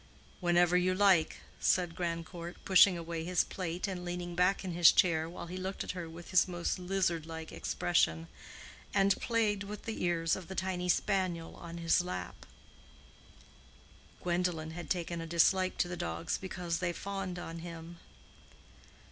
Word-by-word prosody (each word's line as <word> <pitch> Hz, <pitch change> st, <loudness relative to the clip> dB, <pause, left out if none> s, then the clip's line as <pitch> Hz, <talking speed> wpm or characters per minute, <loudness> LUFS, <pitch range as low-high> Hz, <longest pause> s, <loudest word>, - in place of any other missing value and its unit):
"Whenever 175 Hz, 0 st, +3 dB
you 180 Hz, +1 st, +3 dB
like," 185 Hz, -5 st, +3 dB, 0.2 s
said 175 Hz, -2 st, +2 dB
Grandcourt, 170 Hz, 0 st, -4 dB
pushing 190 Hz, -1 st, +6 dB
away 165 Hz, -1 st, -4 dB
his 180 Hz, 0 st, +2 dB
plate, 180 Hz, +1 st, -4 dB
and 185 Hz, -2 st, -4 dB
leaning 175 Hz, 0 st, -4 dB
back 180 Hz, +3 st, +2 dB
in 185 Hz, -, -3 dB
his 170 Hz, -1 st, +7 dB
chair 165 Hz, -4 st, +2 dB
while 175 Hz, -, -7 dB
he 180 Hz, +2 st, -6 dB
looked 190 Hz, +1 st, -4 dB
at -, -, -3 dB
her 175 Hz, -3 st, -6 dB
with 165 Hz, +1 st, -10 dB
his 185 Hz, 0 st, +5 dB
most 175 Hz, 0 st, -2 dB
lizard 180 Hz, -3 st, 0 dB
like 160 Hz, -1 st, -7 dB
expression 80 Hz, -, 0 dB, 0.7 s
and, 195 Hz, 0 st, +3 dB
played 220 Hz, -4 st, +1 dB
with 205 Hz, +1 st, -6 dB
the 225 Hz, -4 st, -4 dB
ears 165 Hz, -2 st, +1 dB
of 185 Hz, -3 st, -8 dB
the 190 Hz, -, -7 dB
tiny 180 Hz, -1 st, -2 dB
spaniel 180 Hz, -3 st, 0 dB
on 170 Hz, 0 st, -8 dB
his 170 Hz, +1 st, +3 dB
lap 90 Hz, -, -6 dB, 1.8 s
(Gwendolen 175 Hz, -2 st, -1 dB
had 175 Hz, +1 st, -7 dB
taken 170 Hz, -2 st, -2 dB
a 165 Hz, -, -6 dB
dislike 185 Hz, +3 st, +3 dB
to -, -, +1 dB
the 175 Hz, -, -4 dB
dogs 85 Hz, -, -2 dB
because 180 Hz, -3 st, -3 dB
they 175 Hz, -1 st, -1 dB
fawned 195 Hz, 0 st, -4 dB
on 165 Hz, -1 st, -6 dB
him). 170 Hz, 0 st, -9 dB
175 Hz, 160 wpm, -32 LUFS, 165-185 Hz, 1.8 s, his